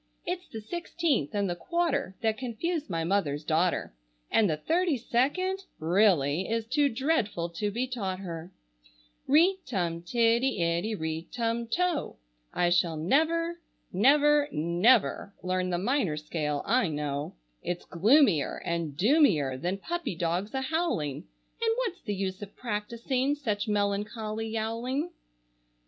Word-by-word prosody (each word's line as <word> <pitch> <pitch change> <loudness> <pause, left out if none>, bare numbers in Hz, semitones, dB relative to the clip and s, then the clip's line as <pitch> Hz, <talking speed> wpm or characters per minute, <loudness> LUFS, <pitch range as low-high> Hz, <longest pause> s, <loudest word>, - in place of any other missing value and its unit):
It's 360 +1 -3
the 220 - -7
sixteenth 325 - -1
and 200 -1 +1
the 175 - -2
quarter 280 - -1
that 220 -1 0
confuse 290 +6 -3
my 165 -2 -1
mother's 160 -5 0
daughter, 165 - +1 0.4
And 215 -4 +4
the 155 - 0
thirty 330 - +1
second, 290 +12 0 0.2
really, 170 -2 +2
is 230 0 0
too 285 +4 +2
dreadful 230 - 0
to 170 +5 -2
be 235 +5 -1
taught 205 -8 -3
her. 170 -2 -7 0.8
Ri 335 +7 +5
tum 175 -8 -2
tiddy 235 +5 +2
iddy, 170 +6 0
ri 160 -1 -4
tum 235 -1 -1
to! 355 -4 0 0.4
I 175 -1 +1
shall 175 -2 +2
never, 330 - +1 0.3
never, 290 +7 +4
never 180 +6 +2
learn 185 0 0
the 175 - 0
minor 200 - 0
scale, 150 -1 -2
I 240 0 +3
know. 145 - -3 0.3
It's 175 0 -4
gloomier 205 - +3
and 165 -4 -2
doomier 190 - +4
than 175 +8 -2
puppy 345 - -3
dogs 175 +7 -2
a 265 - 0
howling, 265 - -1 0.3
And 450 -1 +2
what's 460 -8 -2
the 205 - -3
use 190 0 -3
of 205 0 -9
practising 235 +5 -1
such 225 -7 -2
melancholy 210 +2 -1
yowling? 230 +8 -2
215 Hz, 135 wpm, -28 LUFS, 175-275 Hz, 0.8 s, Ri